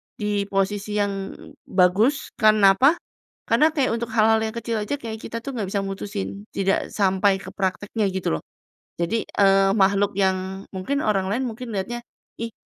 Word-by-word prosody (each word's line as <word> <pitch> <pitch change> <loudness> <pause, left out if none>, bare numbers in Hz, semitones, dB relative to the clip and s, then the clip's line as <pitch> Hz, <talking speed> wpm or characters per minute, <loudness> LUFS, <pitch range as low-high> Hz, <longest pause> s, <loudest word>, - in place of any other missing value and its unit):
di 205 -1 -1
posisi 200 +1 -1
yang 200 -2 -2 0.3
bagus, 195 +9 +2
karena 215 -2 +6
apa? 280 +6 +6 0.5
Karena 310 - +5
kayak 270 -6 +2
untuk 235 - -3
hal-hal 220 0 +5
yang 220 +1 -3
kecil 230 -1 -2
aja 210 +7 -2
kayak 220 -1 -6
kita 230 - -5
tuh 275 - -4
nggak 205 -4 -2
bisa 200 -1 0
mutusin, 200 +1 -5
tidak 195 0 0
sampai 195 0 +3
ke 190 - -8
praktiknya 200 +2 -2
gitu 190 - -1
loh. - - -20 0.6
Jadi, 215 +7 0
eee, 195 -1 +4
makhluk 200 0 +3
yang 190 0 0
mungkin 275 +10 -2
orang 195 -3 +1
lain 245 +5 0
mungkin 230 0 -7
lihatnya, 220 +5 -3 0.4
"Ih, 230 0 -4
205 Hz, 165 wpm, -23 LUFS, 195-225 Hz, 0.6 s, karena